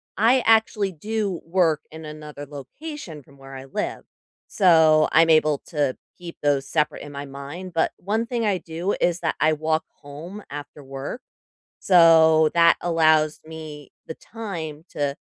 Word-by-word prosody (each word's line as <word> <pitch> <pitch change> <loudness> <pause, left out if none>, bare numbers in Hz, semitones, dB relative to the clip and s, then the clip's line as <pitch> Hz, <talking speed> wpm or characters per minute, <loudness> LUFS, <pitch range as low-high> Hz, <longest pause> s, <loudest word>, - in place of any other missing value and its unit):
I 245 +4 +4
actually 220 -3 +3
do 205 +1 -3
work 165 -3 +1
in 160 0 -10
another 150 -1 -9
location 155 - -9
from 140 +1 -21
where 135 0 -11
I 130 0 -9
live, 210 +10 -4 0.4
so 160 -5 +4
I'm 165 0 +5
able 155 -2 +3
to 145 -6 -1 0.2
keep 175 -2 -10
those 140 -2 +1
separate 150 -2 -1
in 145 - -9
my 140 0 -6
mind, 145 +7 -9
but 165 - +1
one 220 +4 -2
thing 235 -2 -2
I 195 -3 +1
do 170 +4 -3
is 175 0 +1
that 160 - 0
I 155 +1 +3
walk 155 +1 -1 0.2
home 160 +8 -10
after 145 0 -9
work, 135 - -7 0.6
so 160 -3 +6
that 170 0 +5
allows 155 -2 +2
me 155 -3 -10 0.2
the 160 - -6
time 165 -10 -7
to 145 0 -2
160 Hz, 155 wpm, -23 LUFS, 145-180 Hz, 0.6 s, so